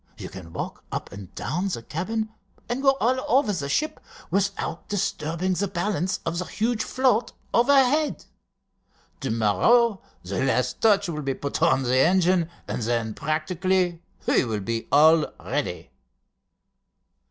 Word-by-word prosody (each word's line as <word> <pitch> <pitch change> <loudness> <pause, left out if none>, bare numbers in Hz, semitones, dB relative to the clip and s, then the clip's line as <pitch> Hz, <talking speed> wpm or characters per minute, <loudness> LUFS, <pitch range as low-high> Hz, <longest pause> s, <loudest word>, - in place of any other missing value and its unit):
You - - -7
can 90 -3 -10
walk - - -6
up - - -4
and 100 -2 -10
down 170 +11 -2
the 145 -12 -4
cabin 215 - -3 0.4
and 245 +3 -2
go 270 -1 +4
all 255 +4 +1
over 250 -4 +3
the 145 -6 -3
ship, 305 - 0 0.3
without 195 -4 -1
disturbing 180 -2 -1
the 200 +3 0
balance 185 +1 -1
of 165 +1 -1
the 180 - -2
huge 225 +3 -1
float 255 -3 +1 0.2
overhead. 275 +4 +3 0.9
To 135 - -3
morrow 190 - +3 0.2
the 95 +6 -2
last 125 -1 0
touch 205 -3 +4
will 155 -3 -3
be 135 -2 -2
put 140 +2 -4
on 160 -5 +3
the 130 +1 +2
engine, 175 +2 +3 0.2
and - - -3
then 115 -1 -1
practically 175 - 0 0.2
we - - +3
will 110 -4 -2
be 115 +3 -3
all 155 +2 +6
ready." - - -3
175 Hz, 145 wpm, -25 LUFS, 135-215 Hz, 0.9 s, all